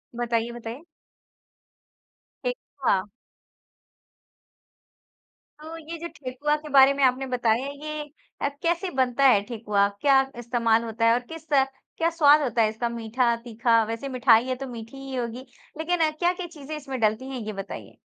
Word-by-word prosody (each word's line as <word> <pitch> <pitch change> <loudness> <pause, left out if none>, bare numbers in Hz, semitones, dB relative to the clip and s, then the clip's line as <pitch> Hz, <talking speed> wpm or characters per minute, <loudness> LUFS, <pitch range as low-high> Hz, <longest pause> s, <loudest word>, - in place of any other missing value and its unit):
बताइए, 235 -1 -1
बताइए। 240 +4 -8 1.6
ठेकुआ। 275 - -1 2.6
तो 320 +2 -8
ये 330 +1 -8
जो 340 - -5
ठेकुआ 275 +3 -1
के 300 0 -10
बारे 275 0 +7
में 280 0 -1
आपने 260 +1 +3
बताया 245 0 +1 0.2
ये 305 0 -4 0.4
अ, - - +1
कैसे 345 +2 0
बनता 260 0 +1
है 215 -6 +5
ठेकुआ? 210 -4 +1
क्या 275 -2 +5 0.2
इस्तेमाल 230 -1 +1
होता 230 0 -1
है 230 - +6
और 240 - +2
किस 325 -1 -10
क्या 270 +5 0
स्वाद 305 -2 +5
होता 245 -4 +1
है 215 - +4
इसका 225 +2 -3
मीठा, 235 +1 0
तीखा? 230 -1 +2
वैसे 230 +5 -4
मिठाई 245 -2 +4
है 255 - -1
तो 270 +1 -6
मीठी 230 +1 -9
ही 270 -1 -7
होगी। 245 +1 -4 0.3
लेकिन 320 0 +1
क्या-क्या 350 +3 -1
चीज़ें 310 -2 -8
इसमें 270 -3 -6
डलती 220 +4 0
हैं 260 - -5
ये 215 - -4
बताइए? 195 0 -8
255 Hz, 150 wpm, -25 LUFS, 230-295 Hz, 2.6 s, बारे